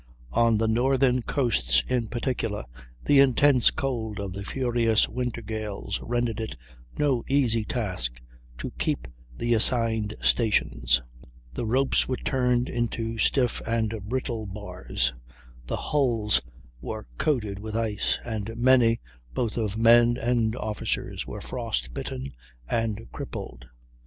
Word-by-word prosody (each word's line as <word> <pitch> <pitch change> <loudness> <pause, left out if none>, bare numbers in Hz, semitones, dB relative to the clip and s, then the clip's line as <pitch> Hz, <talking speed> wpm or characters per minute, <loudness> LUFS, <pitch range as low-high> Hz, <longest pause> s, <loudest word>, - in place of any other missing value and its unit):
On 115 - +3
the 110 +1 +1
northern 130 +2 +3
coasts 65 - +2
in 125 -3 0
particular, 115 -3 -2 0.4
the 145 - +5
intense 135 -1 +5
cold 115 -7 -3
of 100 -2 -4
the 100 +1 -5
furious 120 -2 +2
winter 125 -2 -3
gales 105 -2 -4
rendered 120 -2 -1
it 110 - -5 0.4
no 135 -5 +1
easy 125 -5 +2
task 90 - -2 0.4
to - - -5
keep 60 0 -1 0.3
the 120 - +1
assigned 110 -2 +3
stations; 65 - +2 0.5
the 110 - -3
ropes 130 +4 +3
were 130 - -1
turned 125 -1 +1
into 115 -1 -2
stiff 125 +1 +2
and 115 -1 0 0.2
brittle 120 -4 -2
bars, 90 - -2 0.5
the - - -2
hulls 120 -8 +1 0.4
were - - -5
coated 110 -9 0
with 110 +1 -6
ice, 110 -3 0
and 110 -1 -4
many, 120 -2 +4 0.4
both 115 -3 -1
of 110 -3 -1
men 120 +1 +6
and 115 -2 +1
officers, 110 -4 -3
were - - -6
frost - - -3
bitten 65 +2 -5 0.4
and 115 - -1
crippled. - - -7
115 Hz, 125 wpm, -26 LUFS, 105-125 Hz, 0.5 s, men